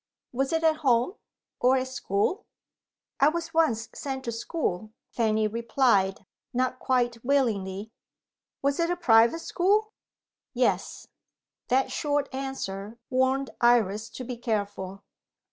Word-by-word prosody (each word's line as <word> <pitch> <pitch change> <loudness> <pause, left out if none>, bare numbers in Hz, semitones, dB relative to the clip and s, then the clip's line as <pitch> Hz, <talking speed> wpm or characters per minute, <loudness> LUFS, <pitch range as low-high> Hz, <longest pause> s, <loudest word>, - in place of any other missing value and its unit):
Was 270 +2 -1
it 325 0 0
at 315 -1 +4
home? 255 +1 +2 0.5
or 255 +2 +4
at 260 0 -1
school? 260 - -1 0.7
"I 280 - +6
was 330 0 -4
once 240 -9 +2
sent 265 -2 -5
to 235 - -2
school," 220 - -3 0.2
Fanny 220 -2 +1
replied, 220 -4 +1 0.3
not 255 0 0
quite 240 -3 0
willingly. 220 -7 0 0.7
"Was 280 +2 +1
it 335 0 +2
a 355 - +1
private 240 -2 +4
school?" 420 +6 +1 0.6
"Yes." - - 0 0.6
That 265 +2 +2
short 290 -2 -1
answer 230 -6 -5
warned 260 +1 +1
Iris 225 -3 +3
to 255 - -5
be 250 0 -5
careful. 205 -4 -3
250 Hz, 125 wpm, -27 LUFS, 220-280 Hz, 0.7 s, I